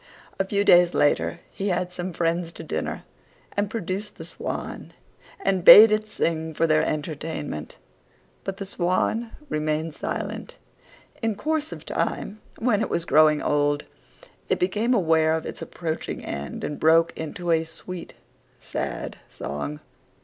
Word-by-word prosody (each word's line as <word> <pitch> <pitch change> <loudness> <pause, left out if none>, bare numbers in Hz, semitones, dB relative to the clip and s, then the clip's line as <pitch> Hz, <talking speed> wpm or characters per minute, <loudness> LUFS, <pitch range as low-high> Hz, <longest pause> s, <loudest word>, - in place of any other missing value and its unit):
A 195 - +2
few 200 +1 +1
days 175 -3 +6
later 85 - +2
he 195 - -3
had 180 -1 -1
some 180 +1 -4
friends 170 0 -1
to - - -9
dinner, 155 - -3 0.5
and 205 0 0
produced 205 -1 -4
the - - -8
Swan, - - -6 0.5
and 190 - 0
bade 215 +4 +11
it 215 0 +1
sing 160 -5 -2
for 165 - +2
their 155 -1 +4
entertainment: 150 - -4 0.7
but 195 -1 -4
the 195 - -5
Swan 190 +5 0 0.2
remained 155 - -1
silent. - - -5 0.7
In 225 -2 0
course 310 +7 -1
of - - -8
time, 215 +2 -2 0.2
when 225 -3 +2
it - - -1
was 170 - -1
growing 155 -1 +5
old, 145 0 +1 0.7
it - - +2
became 215 +7 +1
aware 160 -5 +3
of 160 - -3
its - - -6
approaching 160 -2 -4
end 70 0 -5
and 150 - -4
broke 165 +1 +4
into 170 +2 -3
a 160 -1 +3
sweet, 165 +2 -8 0.4
sad - - -4
song. 75 +1 -5
170 Hz, 145 wpm, -25 LUFS, 155-200 Hz, 0.7 s, bade